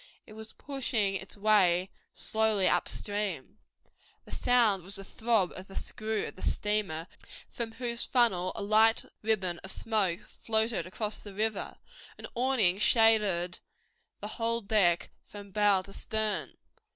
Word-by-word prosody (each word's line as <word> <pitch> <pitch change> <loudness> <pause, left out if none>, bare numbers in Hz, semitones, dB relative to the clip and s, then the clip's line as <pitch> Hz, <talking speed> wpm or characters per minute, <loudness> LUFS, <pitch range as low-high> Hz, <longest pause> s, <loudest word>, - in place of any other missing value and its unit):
It 215 - -14
was 220 +1 -10
pushing 240 -8 -2
its 195 +1 -7
way 190 -3 +3 0.2
slowly 220 -3 +1
up - - +1
stream. 205 -4 -4 0.7
The - - -14
sound 230 -6 +3
was 190 +3 -1
the 195 - -4
throb 220 -3 0
of 185 +1 -9
the 195 - -13
screw 215 -1 -3
of - - -8
the - - -13
steamer 205 -7 -1 0.5
from 230 -2 -4
whose 235 0 -2
funnel 190 -8 +2
a - - -4
light 220 +2 +4 0.2
ribbon 190 -5 0
of 190 - -9
smoke 205 -6 0
floated 220 -2 -1
across 210 +3 -3
the 205 -2 -11
river. 215 0 -2 0.4
An - - -9
awning 235 -7 +2
shaded 210 -6 +3 0.6
the - - -4
whole 230 0 -1
deck 195 -5 +2 0.2
from 205 -1 -11
bow 205 -2 +3
to 195 - -11
stern. 215 -6 -2
210 Hz, 145 wpm, -29 LUFS, 190-225 Hz, 0.7 s, light